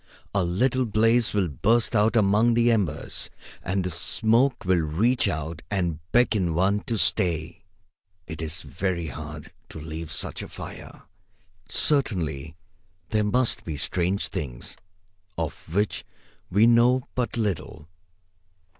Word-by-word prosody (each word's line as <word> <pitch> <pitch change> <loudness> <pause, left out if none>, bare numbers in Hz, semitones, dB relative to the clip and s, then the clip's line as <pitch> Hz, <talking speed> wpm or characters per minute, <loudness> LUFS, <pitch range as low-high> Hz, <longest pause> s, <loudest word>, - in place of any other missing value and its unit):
A 100 -2 +2
little 125 +8 +1
blaze 115 +2 +3
will 100 -3 +1
burst 110 - +1
out 105 +2 +3
among 110 +2 +4
the 120 0 +4
embers, 95 -9 -1 0.3
and 95 +1 -1
the 90 - -3
smoke 115 - +2
will 90 -2 +3
reach 105 +12 +1
out 80 -2 -3
and 90 -6 -1
beckon 105 -9 +2
one 95 +4 +2
to 115 - -1
stay. 85 -4 +1 0.6
It 80 -2 -7
is 80 +2 -4
very 90 -4 -3
hard 75 +2 -8 0.2
to - - -8
leave 80 0 -7
such - - -3
a - - -7
fire. - - -10 0.7
Certainly 80 - +1 0.5
there 110 -1 +1
must 125 +4 +1
be 80 -3 -5
strange 90 +6 -1
things, 60 -5 -6 0.6
of 80 -1 -5
which 105 +4 0 0.5
we 100 +5 +4
know 120 +2 +4
but 125 -1 -2
little. 95 -8 -3
95 Hz, 130 wpm, -25 LUFS, 80-115 Hz, 0.7 s, among